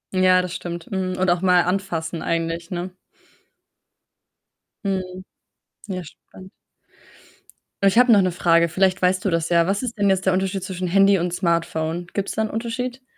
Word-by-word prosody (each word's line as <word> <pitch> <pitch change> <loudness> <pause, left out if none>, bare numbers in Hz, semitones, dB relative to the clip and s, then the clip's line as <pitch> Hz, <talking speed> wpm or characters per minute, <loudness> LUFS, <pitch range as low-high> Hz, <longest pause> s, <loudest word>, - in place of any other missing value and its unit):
Ja, 185 0 +4
das 180 -1 -5
stimmt. 170 -1 -6
Mhm 185 -1 -2
und 185 -1 +1
auch 175 0 0
mal 180 -1 +4
anfassen 175 -3 -3
eigentlich, 165 +1 -2
ne? 180 0 -4 1.9
Mhm. 185 -1 -3 0.7
Ja, 185 -2 -4
spannend. 185 +4 -15 1.4
Ich 210 - -2
habe 245 -2 +6
noch 200 - +6
'ne 185 -1 +1
Frage, 170 -1 +3
vielleicht 185 +2 +1
weißt 185 +3 +1
du - - +2
das 165 -1 -1
ja. 170 0 +3
Was 200 +5 -1
ist 235 -2 -4
denn 200 -1 +2
jetzt 190 0 +1
der 190 - +3
Unterschied 190 0 -1
zwischen 185 -1 -4
„Handy“ 195 +2 +4
und 175 0 -2
„Smartphone“? 170 -1 -1
Gibt's 200 -1 -2
da 220 - -2
'n 215 - -3
Unterschied? 245 +3 -4
185 Hz, 170 wpm, -22 LUFS, 175-195 Hz, 1.9 s, habe